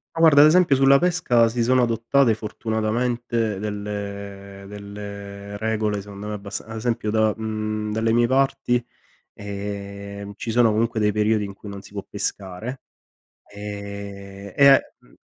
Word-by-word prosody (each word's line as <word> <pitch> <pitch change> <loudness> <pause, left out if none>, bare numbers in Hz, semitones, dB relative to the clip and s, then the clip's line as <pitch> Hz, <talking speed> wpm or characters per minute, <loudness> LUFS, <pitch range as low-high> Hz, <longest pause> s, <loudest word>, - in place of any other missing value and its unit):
Ma 165 - -1
guarda, 150 -3 +8
ad 150 - +9
esempio 170 -3 +5
sulla 135 +1 +6
pesca 150 -9 +3
si 120 +1 -1
sono 130 +1 +4
adottate 115 +2 +3
fortunatamente 110 0 -1
delle 100 -1 -6
delle 100 0 -8
regole 110 -1 -1
secondo 100 0 -9
me 105 - -3
abbasta 100 0 -6
ad 110 - -8
esempio 115 -1 -1
da 110 -1 +3
mhmm, 110 -1 -3
dalle 110 +1 +1
mie 120 +1 +4
parti, 130 -1 +1 0.5
ehm, 100 0 -6
ci 115 - -4
sono 115 -1 +5
comunque 115 +1 0
dei 105 0 +3
periodi 105 0 +1
in 100 -1 -7
cui 105 - -11
non 100 -1 -7
si - - -14
può 100 -1 -5
pescare, 105 +7 -4 0.7
ehm, 100 -1 -7
e 140 -1 +7 0.2
mh - - -24
105 Hz, 150 wpm, -23 LUFS, 100-120 Hz, 0.7 s, ad